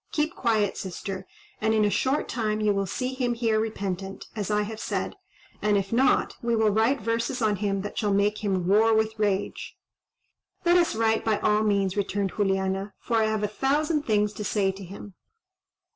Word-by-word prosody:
Keep 310 +2 0
quiet, 215 -5 +1
sister, 190 0 -5 0.3
and 220 +1 +2
in 215 -1 +3
a 205 - +1
short 270 +7 +1
time 215 -3 -1
you 210 -1 +2
will 195 -1 -1
see 255 +7 -3
him 250 -2 -1
here 225 -2 +1
repentant, 195 -3 -4
as 210 -2 -3
I 210 0 +2
have 220 +1 -6
said; - - -3 0.5
and 210 -1 +3
if 195 +2 -2
not, 260 +3 +3
we 235 0 +1
will 220 -1 +3
write 225 +6 +2
verses 230 +3 -1
on 215 -3 +1
him 195 -1 -1
that 205 +1 -5
shall 210 -2 +1
make 205 +2 +1
him 190 -3 0
roar 220 +3 +4
with 220 0 0
rage." 205 -2 -1 0.9
"Let 345 +1 +5
us 340 -7 +2
write 220 0 +2
by 220 -2 +1
all 210 0 +3
means," 200 -3 +1
returned 200 -1 -1
Juliana, 195 0 -1
"for 230 - -1
I 220 - +3
have 215 -1 -1
a - - +2
thousand 290 +8 0
things 210 -1 +2
to 210 - -5
say 200 -2 +1
to 195 +1 -10
him." 195 +2 -10
210 Hz, 195 wpm, -26 LUFS, 200-225 Hz, 0.9 s, Let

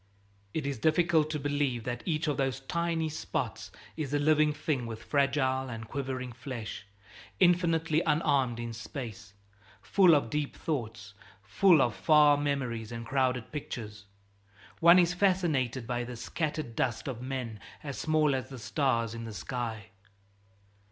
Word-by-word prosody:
It 155 +3 -3
is 140 -4 -3
difficult 160 +2 +3
to 155 -1 -2
believe 145 -4 -1
that 120 0 -4
each 155 -2 0
of 145 -3 0
those 135 -1 -1
tiny 165 +2 -1
spots 155 - -4 0.2
is 150 -4 -4
a - - +4
living 155 +1 +4
thing 150 -5 -2
with 115 -1 -7
fragile 135 -2 +1
and 115 -1 -6
quivering 130 -1 -4
flesh, 115 -6 -7 0.5
infinitely 165 -3 +3
unarmed 140 -6 +2
in 115 -1 -4
space, 110 -3 -8 0.4
full 185 -5 +5
of 130 -6 0
deep 150 -1 -2
thoughts, 110 -9 -4 0.3
full 155 - +5
of 120 - 0
far 150 +1 +5
memories 130 -6 -2
and 115 0 -6
crowded 130 -1 0
pictures. 110 -8 -6 0.7
One 170 +2 +8
is 175 -1 +4
fascinated 165 - +1
by 120 0 -2
this 120 -1 -7
scattered 150 -4 -3
dust 120 0 -1
of 125 -3 -4
men 125 -4 -4 0.2
as 140 -3 -5
small 155 -2 +2
as 130 -1 -3
the 135 - -8
stars 115 -2 0
in 115 0 -6
the 110 - -7
sky. 110 +2 -4
135 Hz, 150 wpm, -30 LUFS, 115-155 Hz, 0.7 s, One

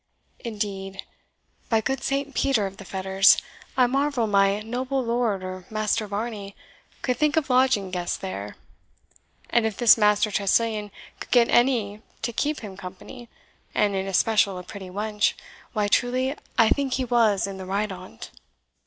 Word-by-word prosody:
Indeed, 200 -4 -5 0.7
by 225 - +3
good 265 +4 -2
Saint 275 0 -2
Peter 255 -7 +1
of 195 0 -6
the 200 - -10
Fetters, 190 +1 +4 0.4
I 255 - +6
marvel 270 -1 +1
my 200 0 +2
noble 255 +4 -2
lord, 230 -5 0
or 185 0 -7
Master 215 0 -1
Varney, 205 -1 -5 0.5
could 250 -2 0
think 300 +2 +1
of 280 -4 +1
lodging 250 -7 +3
guests 175 -1 -2
there; 100 +2 -6 1.0
and 235 - +3
if 220 - -5
this 235 -2 +6
Master 210 0 +3
Tressilian 210 +1 +1 0.3
could - - -8
get 240 -2 +4
any 240 -4 +3
one 215 - -25 0.2
to 235 +1 -2
keep 300 +5 -1
him 205 -4 -8
company, 190 +5 -10 0.5
and 205 -1 +2
in 190 0 -2
especial 200 0 +2
a 180 - -7
pretty 190 +1 -9
wench, 210 +2 0 0.4
why, 210 -3 +1
truly, 255 +5 +1 0.2
I 225 -1 +6
think 275 -2 +1
he 260 - 0
was 230 -5 +3
in 195 -1 -6
the 190 -1 -8
right 200 +2 -1
on't." 185 -11 -10
215 Hz, 160 wpm, -25 LUFS, 195-245 Hz, 1.0 s, I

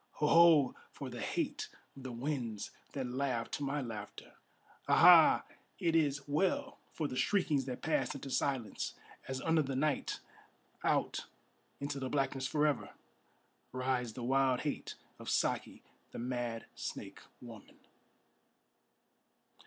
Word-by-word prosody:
Ho! 150 - -1
Ho! 160 -4 +6 0.2
for - - -7
the - - -6
hate - - -2 0.3
of 135 - -11
the 130 -1 -6
winds 120 -4 -3 0.2
that 135 -2 -2
laugh 125 -2 -2
to 145 - -3
my 140 +1 -1
laughter! 110 -4 -8 0.5
Ha! - - +4
Ha! - - +8 0.3
it 165 -1 +1
is 145 -3 +1
well 270 - 0
for 155 - -2
the 130 - -6
shriekings 145 -1 +2
that 125 -2 -6
pass 160 - 0
into 135 0 -7
silence, 130 -7 -1 0.3
As 130 0 -3
under 160 -1 +3
the 135 -2 -3
night, 145 +1 0 0.6
out - - 0 0.5
into 140 0 -3
the 130 -1 -3
blackness 135 -1 0
for 150 +2 +2
ever, 145 -4 -1 0.8
Rides 130 -2 -1
the 125 - -6
wild 130 0 +2
hate 150 - -3 0.2
of - - -6
Saki, - - 0 0.3
the - - -9
mad 120 -2 -3
snake - - -6 0.2
woman! 115 -3 -12
135 Hz, 135 wpm, -34 LUFS, 125-150 Hz, 0.8 s, Ha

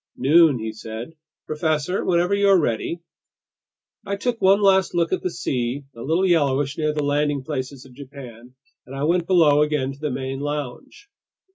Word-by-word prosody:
"Noon," 155 0 +5
he 110 -1 -5
said. 110 +6 -8 0.3
"Professor, 155 +3 -1
whenever 175 +2 +1
you're 200 -1 +4
ready... 150 +5 -2 0.5
." - - -71 0.3
I 200 - -1
took 235 +3 -3
one 195 +2 +5
last 190 -3 +3
look 170 0 +1
at - - -1
the 180 - -2
sea, 130 -3 -3
a 115 - -10
little 165 +8 +1
yellowish 145 -5 +1
near 155 -1 0
the 150 -1 -2
landing 145 -1 0
places 135 -2 -5
of 130 - -16
Japan, 125 -3 -12 0.3
and 135 - -9
I 135 - -3
went 170 +2 +1
below 155 -6 +4
again 150 -3 0
to 140 - -16
the 150 0 -2
main 135 0 -4
lounge. 145 - -6
150 Hz, 175 wpm, -22 LUFS, 130-170 Hz, 0.5 s, Noon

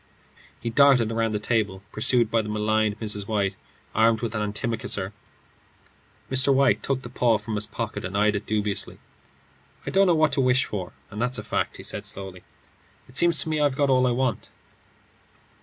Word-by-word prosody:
He 115 - -4
darted 130 -3 +5
round 115 -1 0
the 105 - -1
table, 105 -4 -1
pursued 115 +1 +2
by 115 - +3
the 105 - -7
maligned 105 0 0
Mrs. 105 -2 -3
White 100 -3 0 0.4
armed 110 0 +3
with 115 -2 -3
an 110 - -2
antimacassar. 105 -2 -2 1.2
Mr. 130 +1 +4
White 135 -1 +3
took 135 -1 -2
the 120 - -8
paw 120 -2 +2
from 105 +2 -7
his 105 0 -2
pocket 110 -3 -5
and 95 +2 -3
eyed 105 0 +3
it 100 +1 -4
dubiously. 105 -2 -2 0.9
"I - - -3
don't 195 0 +4
know 175 - +4
what 155 -2 +3
to 140 - +1
wish 130 0 +3
for, 95 -4 -5 0.2
and 105 - -5
that's 125 +1 -1
a - - -5
fact," - - -2
he - - -10
said, - - -2
slowly. 95 -2 -7 0.7
"It 130 - -18
seems 170 +4 +5
to 160 - -6
me 155 -1 0
I've 145 -3 +2
got 140 -2 +2
all 130 -1 +4
I - - +2
want." 125 -2 -1
115 Hz, 190 wpm, -25 LUFS, 105-130 Hz, 1.2 s, darted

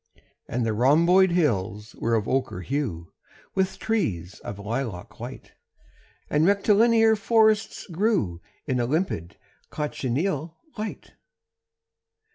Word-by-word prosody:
And 120 0 -1
the 110 - 0
rhomboid 170 - +5
hills 105 - 0
were 115 0 0
of 110 -2 -1
ochre 130 -8 -1
hue 105 - -3 0.4
With 190 0 0
trees 95 - -2
of 100 - -7
lilac 110 -2 -5
white, - - -8 0.8
And 150 +1 +2
rectilinear 220 +4 +4
forests 220 0 +2
grew 175 - 0 0.2
In 130 -4 0
a 120 - 0
limpid 135 - -2 0.3
cochineal 150 +3 -2 0.2
light. 215 0 -6
150 Hz, 105 wpm, -25 LUFS, -, 0.8 s, rhomboid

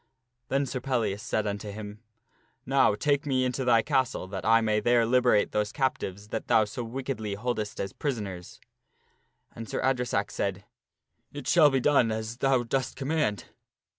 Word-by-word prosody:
Then 140 +2 +1
Sir 130 -1 -4
Pel 130 -2 0
lias 100 -1 -2
said 110 -2 -1
unto 105 0 -4
him, 105 +1 -8 0.3
" - - -39 0.3
Now 135 -5 +3
take 145 +5 0
me 130 -2 +1
into 125 +1 -2
thy 115 -3 +4
castle 130 -9 0
that 95 -1 -5
I 115 +1 +5
may 110 -1 +1
there 120 +1 +3
liberate 120 -3 +3
those 105 0 0
captives 105 -7 -2
that 115 - -4
thou 110 - +4
so 110 +4 -5
wickedly 115 -3 -4
holdest 110 -1 -3
as 95 0 -3
prisoners/' 100 -11 -5 1.0
And 115 -1 -8
Sir - - -2
Adre 130 -2 +1
sack 100 -2 -1
said, 100 -1 -3 0.3
" - - -45
It 145 - -6
shall 160 -4 +6
be 135 -1 +1
done 130 -4 +3
as 110 +1 -4
thou 135 -2 +2
dost 130 +2 -2
command." 135 - -1
115 Hz, 180 wpm, -27 LUFS, 105-130 Hz, 1.0 s, shall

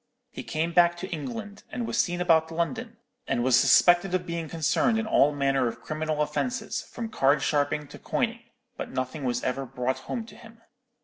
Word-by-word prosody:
He - - -7
came 165 +2 -2
back 175 0 +5
to 185 +2 -6
England, 205 +5 -6
and 240 - -3
was - - -3
seen 175 -1 +1
about 160 -2 +3
London, 225 +8 -3 0.3
and 120 - 0
was 130 -1 +4
suspected 175 +6 +5
of 180 -1 -1
being 170 -2 -4
concerned 165 - +1
in 225 - -1
all 150 -9 +4
manner 135 -3 +1
of 115 - -6
criminal 155 0 -1
offences, 250 - -2
from 230 - -6
card 140 -8 +2
sharping 145 0 0
to - - -11
coining, - - -1 0.3
but - - -5
nothing 130 +3 -4
was 125 -1 -1
ever 130 +2 -1
brought 130 0 -2
home 225 - -5
to 230 - -14
him. 230 -1 -16
165 Hz, 190 wpm, -27 LUFS, 140-200 Hz, 0.3 s, back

